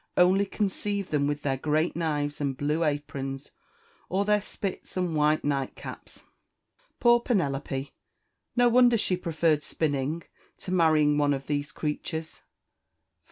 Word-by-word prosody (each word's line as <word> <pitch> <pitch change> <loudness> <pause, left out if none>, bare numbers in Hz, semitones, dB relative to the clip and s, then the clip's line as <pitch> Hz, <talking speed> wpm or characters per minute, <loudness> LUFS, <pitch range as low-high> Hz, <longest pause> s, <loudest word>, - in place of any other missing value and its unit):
only 190 +3 +4
conceive 200 -1 -2
them 145 -2 +2
with 145 0 -2
their 135 -2 0
great 155 +4 0
knives 150 -3 -1
and 135 -2 -1
blue 150 +4 0
aprons, 140 -2 -3 0.6
or 195 +2 +1
their 210 0 +3
spits 195 -1 -5
and 180 -3 0
white 150 +1 +2
nightcaps! 140 -2 -4 0.8
Poor 240 0 +5
Penelope! 140 - -1 0.6
no 245 0 +5
wonder 240 0 +5
she 185 - +1
preferred 165 -3 +1
spinning 150 +1 -2 0.3
to 185 - -7
marrying 155 -4 +4
one 145 -1 +3
of 135 0 -7
these 145 -1 -2
creatures! 160 +2 -4
155 Hz, 130 wpm, -27 LUFS, 145-185 Hz, 0.8 s, Poor